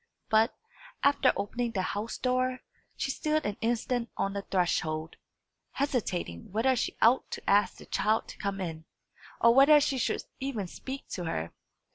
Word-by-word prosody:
But, 220 Hz, +2 st, +3 dB, 0.5 s
after 280 Hz, -2 st, +5 dB
opening 235 Hz, +3 st, -2 dB
the 190 Hz, -3 st, 0 dB
house 205 Hz, +4 st, -3 dB
door, 255 Hz, 0 st, 0 dB, 0.4 s
she 270 Hz, -, -1 dB
stood 310 Hz, +2 st, 0 dB
an 205 Hz, -, -1 dB
instant 235 Hz, +1 st, 0 dB
on 195 Hz, -, 0 dB
the 200 Hz, -, -2 dB
threshold, 160 Hz, -4 st, -1 dB, 0.6 s
hesitating 190 Hz, -, -2 dB
whether 240 Hz, +6 st, +2 dB
she 245 Hz, -, -2 dB
ought 240 Hz, +4 st, +4 dB
to -, -, -7 dB
ask 205 Hz, +1 st, +4 dB
the -, -, -12 dB
child 215 Hz, +1 st, +1 dB
to -, -, -9 dB
come 200 Hz, -1 st, -2 dB
in, 165 Hz, -3 st, -5 dB, 0.6 s
or 235 Hz, 0 st, +7 dB
whether 280 Hz, +4 st, +8 dB
she 275 Hz, -2 st, 0 dB
should -, -, 0 dB, 0.2 s
even 260 Hz, -7 st, -3 dB
speak 265 Hz, +9 st, -7 dB
to 180 Hz, -, -4 dB
her. 80 Hz, -, -3 dB
225 Hz, 160 wpm, -29 LUFS, 195-260 Hz, 0.6 s, whether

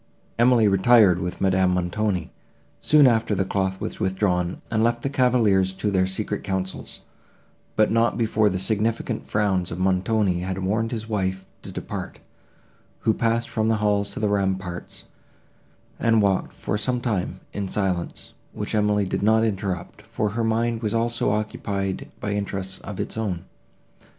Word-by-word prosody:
Emily 120 Hz, -2 st, +5 dB
retired 95 Hz, -1 st, +5 dB
with 90 Hz, -1 st, -4 dB
Madame 95 Hz, -1 st, +3 dB
Montoni, 90 Hz, 0 st, -1 dB, 0.5 s
soon 150 Hz, -2 st, +5 dB
after 115 Hz, -4 st, +3 dB
the 95 Hz, 0 st, 0 dB
cloth 95 Hz, 0 st, -1 dB
was -, -, -5 dB
withdrawn, 90 Hz, -2 st, 0 dB
and 110 Hz, -1 st, +2 dB
left 120 Hz, 0 st, +1 dB
the 135 Hz, -, -1 dB
cavaliers 115 Hz, -8 st, +3 dB
to 100 Hz, +2 st, -2 dB
their 95 Hz, -1 st, +2 dB
secret 105 Hz, +2 st, -3 dB
councils, 95 Hz, -1 st, -4 dB, 0.7 s
but 110 Hz, -1 st, +3 dB
not 115 Hz, +1 st, +2 dB
before 110 Hz, -2 st, +2 dB
the 95 Hz, -, -2 dB
significant 110 Hz, +4 st, -1 dB
frowns 95 Hz, -4 st, +1 dB
of 85 Hz, -, -5 dB
Montoni 95 Hz, +1 st, +1 dB
had 95 Hz, +1 st, -3 dB
warned 110 Hz, +4 st, -1 dB
his 110 Hz, -2 st, -4 dB
wife 95 Hz, -3 st, -2 dB, 0.2 s
to -, -, -9 dB
depart, -, -, -6 dB, 0.8 s
who 110 Hz, -, +3 dB
passed 115 Hz, +1 st, 0 dB
from 110 Hz, 0 st, -1 dB
the 115 Hz, -, +3 dB
hall 105 Hz, -1 st, +2 dB
to 100 Hz, -, -7 dB
the 110 Hz, -, +1 dB
ramparts, 95 Hz, -3 st, -2 dB, 1.0 s
and 115 Hz, -1 st, +3 dB
walked, 100 Hz, -2 st, +1 dB
for 105 Hz, -, -3 dB
some 125 Hz, +4 st, 0 dB
time, 110 Hz, -7 st, -2 dB
in 100 Hz, -1 st, -3 dB
silence, 95 Hz, -3 st, -2 dB, 0.2 s
which -, -, -4 dB
Emily 105 Hz, -1 st, +2 dB
did 95 Hz, -, -2 dB
not 110 Hz, +2 st, +4 dB
interrupt, 95 Hz, -5 st, -3 dB
for 105 Hz, -, -2 dB
her 115 Hz, +3 st, -2 dB
mind 115 Hz, +1 st, 0 dB
was 110 Hz, -1 st, -1 dB
also 115 Hz, 0 st, +1 dB
occupied 100 Hz, -2 st, -2 dB
by 105 Hz, -, -3 dB
interests 95 Hz, -2 st, -3 dB
of 100 Hz, -2 st, -8 dB
its -, -, -4 dB
own. 95 Hz, -6 st, -2 dB
105 Hz, 160 wpm, -24 LUFS, 95-110 Hz, 1.0 s, Emily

